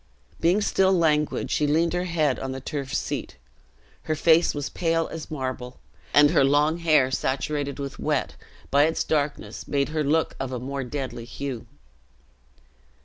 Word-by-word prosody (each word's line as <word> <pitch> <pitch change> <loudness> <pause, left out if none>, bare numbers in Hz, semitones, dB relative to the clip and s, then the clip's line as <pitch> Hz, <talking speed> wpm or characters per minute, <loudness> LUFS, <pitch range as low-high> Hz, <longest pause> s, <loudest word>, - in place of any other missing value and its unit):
Being 180 +5 +3
still 190 -2 +3
languid, 155 -4 +1
she 150 - +2
leaned 165 +3 +2
her 180 +1 -1
head 155 -6 +1
on 135 0 -4
the 135 - -5
turf 135 0 -5
seat. - - -3 0.7
Her 155 - +2
face 165 +1 +4
was 145 -1 -2
pale 165 -1 0
as 165 -1 -7
marble, 130 -3 -5 0.3
and 145 0 +6
her 165 - +4
long 145 +4 +3
hair, 155 -6 +3
saturated 140 +2 -2
with 140 -1 -6
wet, - - -1 0.4
by 145 +1 +5
its 160 - 0
darkness 150 -2 -2
made 140 0 0
her 155 0 -1
look 155 +3 +1
of 135 -1 -3
a 125 - -3
more 135 +2 -4
deadly 125 -2 -5
hue. 125 0 -6
145 Hz, 160 wpm, -25 LUFS, 135-160 Hz, 0.7 s, and